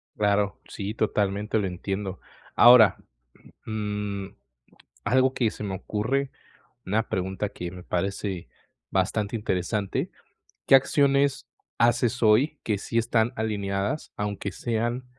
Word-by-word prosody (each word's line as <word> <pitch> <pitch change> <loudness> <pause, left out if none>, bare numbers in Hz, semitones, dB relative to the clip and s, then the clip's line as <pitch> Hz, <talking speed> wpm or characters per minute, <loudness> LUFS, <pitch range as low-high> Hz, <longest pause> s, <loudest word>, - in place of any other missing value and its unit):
Claro, 100 -1 +1
sí, 100 +1 -5
totalmente 105 0 0
lo 95 - 0
entiendo. 95 +1 -4 0.4
Ahora, 120 -5 +8 0.7
mm, 105 -2 -3 0.8
algo 130 +4 +3
que 115 -4 +1
se - - -9
me 95 -2 -3
ocurre, 130 +8 -1 0.6
una 110 +4 0
pregunta 95 +2 -2
que 90 0 -6
me 90 -1 -9
parece 95 0 -3 0.4
bastante 100 +3 0
interesante, 100 0 -2 0.5
¿qué - - +3
acciones 140 -1 +3 0.3
haces 120 0 +2
hoy 125 +8 +4
que 105 -3 0
sí 115 - -3
están 115 0 +2
alineadas, 100 +3 -2
aunque 100 -1 -3
sean 120 +4 -2
105 Hz, 115 wpm, -26 LUFS, 100-120 Hz, 0.8 s, Ahora